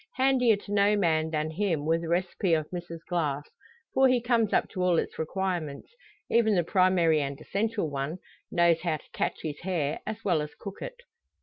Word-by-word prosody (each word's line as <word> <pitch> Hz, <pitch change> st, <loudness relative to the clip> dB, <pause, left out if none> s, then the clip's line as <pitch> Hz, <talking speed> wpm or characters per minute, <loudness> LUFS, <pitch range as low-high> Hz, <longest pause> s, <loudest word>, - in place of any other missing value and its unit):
Handier 255 Hz, -3 st, +4 dB
to 200 Hz, 0 st, -10 dB
no 205 Hz, +1 st, +4 dB
man 160 Hz, -4 st, +2 dB
than 155 Hz, 0 st, -1 dB
him 165 Hz, -4 st, -1 dB
were 165 Hz, +1 st, +2 dB
the 165 Hz, -, -5 dB
recipe 175 Hz, 0 st, +1 dB
of 155 Hz, -1 st, -2 dB
Mrs 170 Hz, -2 st, -6 dB
Glass, 150 Hz, -5 st, -1 dB, 0.5 s
for 265 Hz, 0 st, +5 dB
he 255 Hz, -1 st, +3 dB
comes 235 Hz, -3 st, +1 dB
up -, -, +2 dB
to 185 Hz, -, -4 dB
all 180 Hz, -2 st, +3 dB
its -, -, -2 dB
requirements 170 Hz, -, -3 dB, 0.3 s
even 220 Hz, -3 st, +3 dB
the 175 Hz, -, +3 dB
primary 175 Hz, -3 st, +3 dB
and 140 Hz, 0 st, -4 dB
essential 205 Hz, +2 st, -1 dB
one 140 Hz, +3 st, -3 dB, 0.3 s
knows 170 Hz, -2 st, +3 dB
how 170 Hz, -3 st, 0 dB
to -, -, -21 dB
catch -, -, -2 dB
his 150 Hz, -2 st, -4 dB
hare 165 Hz, -5 st, -1 dB
as 220 Hz, +1 st, -5 dB
well 175 Hz, -6 st, +2 dB
as 150 Hz, 0 st, -6 dB
cook 200 Hz, -1 st, -9 dB
it. -, -, -7 dB
175 Hz, 195 wpm, -28 LUFS, 155-205 Hz, 0.5 s, for